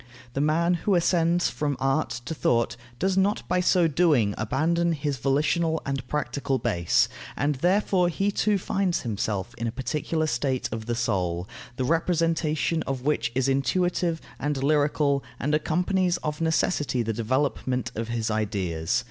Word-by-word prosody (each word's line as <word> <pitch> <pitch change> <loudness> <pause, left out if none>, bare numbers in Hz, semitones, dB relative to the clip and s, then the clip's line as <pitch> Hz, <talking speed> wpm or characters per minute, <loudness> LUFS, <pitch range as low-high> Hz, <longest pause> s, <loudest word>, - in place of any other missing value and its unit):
The 135 - -1
man 165 +4 +2
who 200 - +2
ascends 175 0 +2
from 145 -2 -2
art 135 +1 +1 0.2
to - - -3
thought 120 -6 +1 0.2
does 190 +6 0
not 200 +2 0
by 180 +1 +1
so 180 -1 +4
doing 145 -10 +3
abandon 165 +10 +1
his 145 -2 -2
volitional 155 +5 +1
and 135 -2 -3
practical 135 -1 -1
base, 90 -10 +2 0.3
and 145 +1 +1
therefore 185 -1 +3
he 195 +4 0
too 205 0 +1
finds 190 -1 0
himself 105 -1 -2
in 115 - -1
a - - -1
particular 150 +5 -2
state 130 -2 -1
of 110 0 -5
the 120 - 0
soul, 90 -6 -1 0.3
the 130 - -2
representation 165 0 +1
of 130 -2 -3
which 130 -6 0
is 130 0 +1
intuitive 165 +5 +1 0.2
and 145 -2 -1
lyrical, 145 -1 +2 0.2
and 145 +4 -1
accompanies 180 +3 +1
of 150 +1 -3
necessity 155 -5 +1
the 115 0 -2
development 125 +2 -1
of 115 -1 -4
his 115 -1 -2
ideas. 95 -7 -1
145 Hz, 155 wpm, -26 LUFS, 120-170 Hz, 0.3 s, so